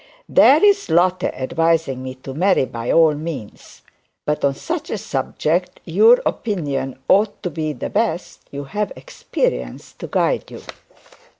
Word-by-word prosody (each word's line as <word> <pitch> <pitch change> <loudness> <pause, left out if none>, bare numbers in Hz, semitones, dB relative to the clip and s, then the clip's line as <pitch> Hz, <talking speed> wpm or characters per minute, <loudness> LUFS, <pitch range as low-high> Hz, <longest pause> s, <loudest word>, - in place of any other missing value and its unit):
'There's 400 +8 +5
Lotte 180 +2 +2
advising 160 0 0
me 130 0 -6
to 130 +1 -9
marry 180 -1 +2
by 115 -1 -4
all 160 -2 +5
means. 150 -8 -8 0.4
But 150 0 -1
on 140 -1 +2
such 330 - -4
a - - -2
subject - - -2
your 475 +3 +5
opinion 145 - -2
ought 205 +2 +2
to 180 - -2
be 155 -2 -2
the 125 - -6
best; 200 -5 -2
you 140 0 -6
have 205 +8 -3
experience - - -4
to - - -6
guide - - 0
you.' - - -10
160 Hz, 140 wpm, -20 LUFS, 135-200 Hz, 0.4 s, There's